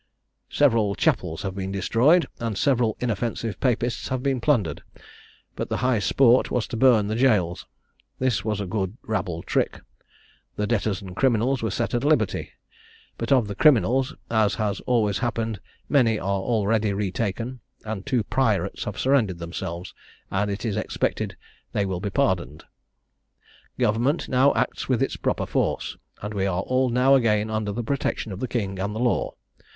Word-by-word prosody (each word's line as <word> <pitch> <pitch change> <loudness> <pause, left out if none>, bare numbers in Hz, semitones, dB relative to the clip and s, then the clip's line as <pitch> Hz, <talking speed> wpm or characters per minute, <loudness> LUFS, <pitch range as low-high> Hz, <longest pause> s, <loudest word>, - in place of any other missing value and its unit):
"Several 115 -8 +3
chapels 80 +1 0
have 95 -2 -3
been 95 0 -4
destroyed, 120 - +3
and 115 -3 -3
several 120 -5 +2
inoffensive 115 -1 -2
Papists 120 -2 0
have 130 -1 -2
been 135 -3 0
plundered: 105 - +1 0.7
but - - -4
the - - -1
high 125 -4 +3
sport 125 +5 +4
was 120 - 0
to - - -4
burn 115 -3 +5
the 110 +2 -2
gaols. 105 -9 +2 0.5
This 125 -8 0
was 105 -1 -1
a 100 - -2
good 95 +2 -3
rabble 90 -6 -3
trick. - - 0 0.8
The 105 - -1
debtors 105 -2 0
and 95 - -8
the - - -9
criminals 125 +3 +2
were 110 - -1
set 115 +4 -2
at 120 +1 0
liberty; 145 -9 +1 0.7
but 115 - -3
of 125 -6 +4
the 100 - -4
criminals, 130 - +3 0.2
as 110 -2 +2
has 105 -3 -1
always 110 -5 +2
happened, 115 -4 -2 0.3
many 120 -6 +3
are 100 +1 -1
already 110 -1 +1
retaken; 105 +5 -2 0.3
and 110 -3 -4
two 120 0 0
pirates 105 -7 0
have 105 - -5
surrendered 125 -9 +2
themselves, 85 +1 -6 0.4
and 100 +2 0
it 100 +4 -4
is 105 -2 -1
expected 110 - -2 0.4
they 100 - +1
will 95 -2 -2
be 100 - -2
pardoned. 90 -5 0 1.1
"Government 120 +9 +1
now 130 +2 +4
acts - - -1
with - - +2
its - - -2
proper - - -1
force; - - -1 0.3
and 105 +1 -4
we 100 -1 0
are 90 -1 0
all 130 +3 +1
now 125 +3 +4
again 110 -4 +3
under 110 -1 -1
the 120 +4 -3
protection 120 -3 -2
of 95 - -6
the 130 - -2
king 100 -6 -3
and 100 +2 -2
the - - -3
law. 120 -1 0
110 Hz, 170 wpm, -24 LUFS, 100-125 Hz, 1.1 s, burn